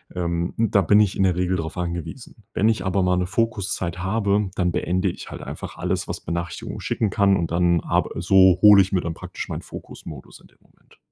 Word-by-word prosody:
ähm, 85 -1 -2
da 110 -3 +3
bin 105 +3 +4
ich 105 -3 +2
in 95 - +1
der 90 -2 +2
Regel 90 +1 0
darauf 80 -1 -5
angewiesen. 90 - -6
Wenn 105 - +2
ich 110 -4 0
aber 95 +1 +1
mal 90 0 +2
'ne 90 0 0
Fokuszeit 95 -4 -2
habe, 100 +1 0
dann 90 -1 0
beende 90 +1 0
ich - - -8
halt - - -8
einfach - - -8
alles, 90 +2 -2
was - - -4
Benachrichtigungen 85 0 -5
schicken 110 - -1
kann. 100 +1 +3
Und 85 -1 -3
dann 85 0 +2
arb - - 0
so 95 0 +5
hole 105 -1 +8
ich 95 - -1
mir 95 - +2
dann 85 -1 -4
praktisch - - -7
meinen - - -5
Fokus-Modus 70 -5 -11
in - - -19
dem - - -30
Moment. - - -27
90 Hz, 215 wpm, -23 LUFS, 85-100 Hz, -, hole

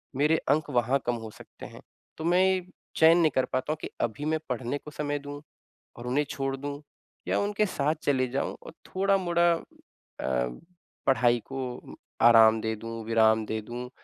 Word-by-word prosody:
मेरे 150 +4 +3
अंक 150 +1 +2
वहाँ 125 +1 +2
कम 120 0 0
हो 110 - -6
सकते - - -13
हैं। - - -11 0.4
तो 160 - -6
मैं 180 +2 +4
ये, 185 -1 +1 0.3
चयन 165 +2 +7
नहीं 160 -4 +4
कर 130 - +3
पाता 130 +4 0
हूँ - - -7
कि - - -5
अभी 120 +6 -2
मैं 155 0 0
पढ़ने 125 +2 -2
को 150 - -12
समय 145 0 -2
दूँ 145 0 -8 0.6
और 120 +1 -7
उन्हें 145 +4 +1
छोड़ 135 0 -2
दूँ 145 +1 -6 0.5
या - - +1
उनके 205 +1 +1
साथ 155 -4 0
चले 130 -3 +2
जाऊँ? 135 - -2
और - - -9 0.2
थोड़ा-मोड़ा 185 -3 +2
अ, - - -7 1.4
पढ़ाई 120 -3 +4
को 130 -2 -6 0.3
आराम 115 -1 +7
दे 110 0 -1
दूँ, 115 +1 -7
विराम 110 -1 +3
दे 110 0 -3
दूँ। 120 +3 -7
140 Hz, 180 wpm, -27 LUFS, 120-155 Hz, 1.4 s, चयन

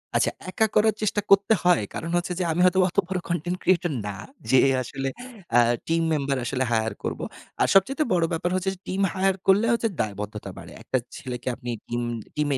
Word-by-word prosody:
আচ্ছা, - - +3 0.2
একা 205 +4 +2
করার 215 +1 +5
চেষ্টা 210 -1 +1
করতে 200 +2 +6
হয়। 175 -9 +4
কারণ 165 - -4
হচ্ছে 175 +1 -2
যে - - +1
আমি 160 - -1
হয়তো 185 +1 +4
অত - - -17
বড় 190 0 -2
কনটেন্ট 175 +1 -1
ক্রিয়েটর 175 -2 +2 0.2
না 100 - -4 0.4
যে 130 - +7 0.2
আসলে 135 +2 -3 0.4
অ্যা 120 +1 +6 0.3
টিম 165 0 +2
মেম্বার 140 -2 0
আসলে 130 +2 0
হায়ার 110 -2 +1
করব। - - -3 0.4
আর - - +4
সবচাইতে 270 - +4
বড় 170 -2 +3
ব্যাপার 170 +2 -1
হচ্ছে 185 +1 0
যে - - -23
টিম 190 +1 -1
হায়ার 190 0 +2
করলে 195 +3 +5
হচ্ছে 230 0 +1
দায়বদ্ধতা 105 0 -5
বাড়ে। - - -10
একটা 130 - 0 0.2
ছেলেকে 125 -1 -6
আপনি 125 -1 -8 0.2
টিম 120 0 -2 0.3
টিমে 145 -2 +1
170 Hz, 195 wpm, -25 LUFS, 130-190 Hz, 0.4 s, যে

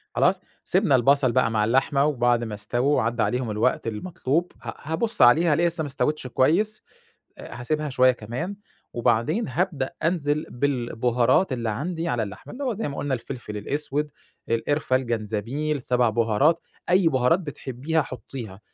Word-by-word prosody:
خلاص؟ - - +3 0.2
سِبْنا 135 - +3
البصل 130 +1 +4
بقى 125 -2 +2
مع 110 -1 +1
اللحمة، 135 +4 +2
وبعد 120 -5 +2
ما 110 -2 -5
اسْتَووا 120 +7 0
وعدى 120 0 +1
عليهم 125 -2 -1
الوقت 105 +2 0
المطلوب 155 +7 -2
ه - - -6
هابُص 160 +10 -1
عليها 155 +7 +6
الاقيها 170 +3 +3
لسه 170 -1 -4
ما 155 - -2
اسْتَوِتش 135 +1 -1
كويس، 190 - +1 0.6
هاسيبها 150 +5 -3
شوية 130 -1 +4
كمان، 125 - -5 0.4
وبعدين 130 - +1
هابدأ 145 -1 -1
أنزل 155 -3 0
بالبُهارات 125 +3 +1
اللي 120 -3 -2
عندي 165 +9 -3
على 120 -5 0
اللحمة، 100 -2 -8
اللي 280 +3 -5
هو 255 - 0
زي 220 -3 -3
ما 140 - -6
قُلنا 145 -2 -1
الفلفل 120 -3 -6
الأسود، 145 +6 -2 0.4
القرفة، 130 +3 +1
الجنزبيل، 120 +5 -2
7 125 -1 +2
بُهارات، 115 +9 +2 0.3
أي 180 -1 +5
بُهارات 130 +4 +2
بتحبيها 145 0 -2
حُطيها 115 -5 -8
130 Hz, 150 wpm, -24 LUFS, 120-155 Hz, 0.6 s, عليها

